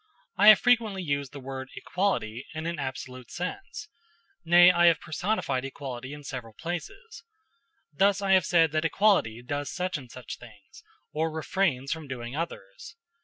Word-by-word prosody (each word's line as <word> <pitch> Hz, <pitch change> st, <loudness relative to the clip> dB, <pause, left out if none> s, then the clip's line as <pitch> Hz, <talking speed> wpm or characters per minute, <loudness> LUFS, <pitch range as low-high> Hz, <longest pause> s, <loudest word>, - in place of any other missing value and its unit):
I 205 Hz, -, +4 dB
have 215 Hz, -2 st, +11 dB
frequently 225 Hz, -6 st, +2 dB
used 140 Hz, -4 st, -2 dB
the 145 Hz, -, -9 dB
word 130 Hz, 0 st, -7 dB
"equality" 135 Hz, -, -2 dB
in 160 Hz, +1 st, -4 dB
an 170 Hz, -2 st, -3 dB
absolute 130 Hz, -2 st, -6 dB
sense 340 Hz, -, -6 dB, 0.6 s
nay, 175 Hz, +2 st, +7 dB
I 175 Hz, -1 st, +4 dB
have 165 Hz, -2 st, +5 dB
personified 170 Hz, -5 st, -2 dB
equality 130 Hz, -1 st, -6 dB
in 145 Hz, 0 st, -9 dB
several 125 Hz, -5 st, -7 dB
places; 175 Hz, -, -7 dB, 0.7 s
thus 195 Hz, +5 st, +3 dB
I 195 Hz, -1 st, 0 dB
have 190 Hz, -2 st, +5 dB
said 165 Hz, -3 st, +4 dB
that 155 Hz, +1 st, 0 dB
equality 165 Hz, -, +2 dB
does 145 Hz, +3 st, -3 dB
such 180 Hz, -3 st, -2 dB
and 125 Hz, -3 st, -13 dB
such 125 Hz, -1 st, -9 dB
things, 110 Hz, -4 st, -16 dB, 0.3 s
or 160 Hz, +2 st, 0 dB
refrains 160 Hz, -4 st, -1 dB
from 160 Hz, -2 st, -4 dB
doing 125 Hz, -1 st, -6 dB
others. 165 Hz, -, -6 dB
155 Hz, 160 wpm, -27 LUFS, 130-185 Hz, 0.7 s, have